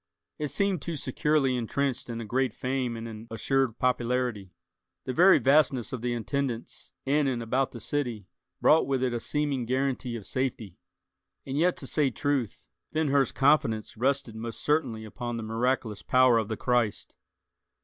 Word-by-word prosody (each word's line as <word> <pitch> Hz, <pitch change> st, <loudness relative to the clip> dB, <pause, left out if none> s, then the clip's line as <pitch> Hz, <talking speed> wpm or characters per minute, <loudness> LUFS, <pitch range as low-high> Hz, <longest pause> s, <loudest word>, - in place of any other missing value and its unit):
It 150 Hz, -, -1 dB
seemed 185 Hz, +4 st, 0 dB
too 170 Hz, +1 st, -4 dB
securely 140 Hz, -1 st, +1 dB
intrenched 125 Hz, +2 st, -2 dB
in 115 Hz, -1 st, -4 dB
a 115 Hz, -, -5 dB
great 130 Hz, +1 st, 0 dB
fame 130 Hz, -2 st, -2 dB
and 115 Hz, 0 st, -6 dB
an 110 Hz, 0 st, -9 dB
assured 115 Hz, +2 st, 0 dB
popularity. 125 Hz, -5 st, 0 dB, 0.5 s
The 130 Hz, -, -2 dB
very 185 Hz, +7 st, +7 dB
vastness 135 Hz, -5 st, +3 dB
of 125 Hz, -, -4 dB
the 120 Hz, 0 st, -1 dB
attendance 120 Hz, 0 st, -3 dB, 0.2 s
in 145 Hz, +1 st, +2 dB
and 120 Hz, -3 st, -1 dB
about 130 Hz, +4 st, 0 dB
the 120 Hz, -, -8 dB
city 120 Hz, -6 st, -3 dB, 0.3 s
brought 160 Hz, -, +4 dB
with 135 Hz, -2 st, 0 dB
it 125 Hz, -2 st, 0 dB
a 120 Hz, -, -1 dB
seeming 140 Hz, -2 st, -1 dB
guaranty 130 Hz, -1 st, -1 dB
of 110 Hz, -4 st, -7 dB
safety. 115 Hz, -6 st, -3 dB, 0.7 s
And 135 Hz, -, -4 dB
yet, 175 Hz, +4 st, +2 dB
to -, -, -6 dB
say 150 Hz, -3 st, +1 dB
truth, 135 Hz, -3 st, -2 dB, 0.3 s
Ben 155 Hz, -1 st, 0 dB
Hur's 135 Hz, -2 st, +3 dB
confidence 135 Hz, -6 st, +2 dB
rested 130 Hz, -1 st, 0 dB
most 115 Hz, 0 st, -6 dB
certainly 120 Hz, -8 st, 0 dB
upon 120 Hz, +2 st, -5 dB
the 115 Hz, -, -4 dB
miraculous 115 Hz, -1 st, -1 dB
power 125 Hz, -2 st, +4 dB
of 110 Hz, -, -2 dB
the 110 Hz, -1 st, -3 dB
Christ. 120 Hz, -4 st, 0 dB
125 Hz, 170 wpm, -28 LUFS, 115-140 Hz, 0.7 s, very